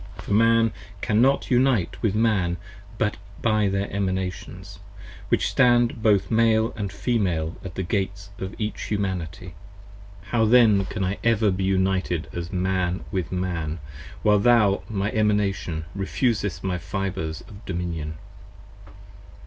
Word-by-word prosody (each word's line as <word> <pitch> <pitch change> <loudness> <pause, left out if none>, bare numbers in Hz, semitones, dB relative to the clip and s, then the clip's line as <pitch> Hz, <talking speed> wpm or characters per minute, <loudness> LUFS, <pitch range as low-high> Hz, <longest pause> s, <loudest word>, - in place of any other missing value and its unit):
10 100 - -10
For - - -1
Man 115 +1 +4 0.3
cannot 125 +6 +2
unite 125 -7 +2
with 105 -3 +1
Man 100 -6 +2 0.4
but 105 0 0 0.3
by 110 -2 +3
their 100 +1 -1
Emanations, 95 -1 -3 0.5
Which - - +2
stand 120 -3 +3
both 105 -2 +3
Male 115 0 +3 0.2
& - - -8
Female 95 -6 -1
at 90 -3 -8
the 95 - -2
Gates 100 +2 -3
of 95 +2 -5
each 105 -1 -3
Humanity. 90 -4 -3 0.8
How 115 -2 +3
then 110 -4 +5
can 95 +1 -3
I 95 +2 -2
ever 115 -2 +3
again 95 - -1
be 95 - -1
united 95 -3 0
as 85 -1 -5
Man 95 0 0
with 95 -5 -2
Man 85 -4 -2 0.5
While 105 -1 +5
thou, 105 -3 +4
my 105 -1 -1
Emanation, 100 -7 0
refusest 105 0 -1
my 90 -2 -1
Fibres 95 -3 -3
of 105 +1 -13
dominion? 85 -4 -3
100 Hz, 135 wpm, -24 LUFS, 90-110 Hz, 0.8 s, then